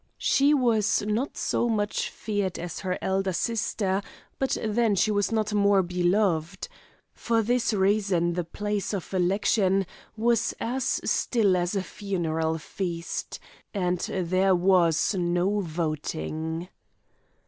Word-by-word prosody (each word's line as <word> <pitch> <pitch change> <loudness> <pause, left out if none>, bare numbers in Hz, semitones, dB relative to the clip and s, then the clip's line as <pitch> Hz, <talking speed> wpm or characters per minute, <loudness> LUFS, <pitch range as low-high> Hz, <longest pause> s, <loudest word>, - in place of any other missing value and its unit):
She 280 +2 +3
was 225 -7 +2
not 215 +7 -2
so 240 - 0
much 210 -2 -1
feared 205 -4 -3
as 175 -1 -5
her 185 -1 -2
elder 190 0 0
sister, 200 -2 -1 0.4
but 265 -2 0
then 220 -1 +2
she 215 +3 +2
was 205 -1 +1
not 215 -1 0
more 200 -2 +4
beloved. 175 -1 0 0.5
For 230 -1 0
this 245 +2 +1
reason 195 -4 +2
the 175 0 -1
place 205 +4 -3
of 195 0 -6
election 190 +1 +2 0.3
was 230 0 +1
as 250 +2 -1
still 210 -6 +2
as 175 +2 -1
a 195 - 0
funeral 165 -6 -2
feast, 170 +1 -5 0.4
and 180 -2 0
there 185 +1 +2
was 175 -1 +3
no 180 +2 +1
voting. 160 0 -3
195 Hz, 125 wpm, -26 LUFS, 175-215 Hz, 0.5 s, more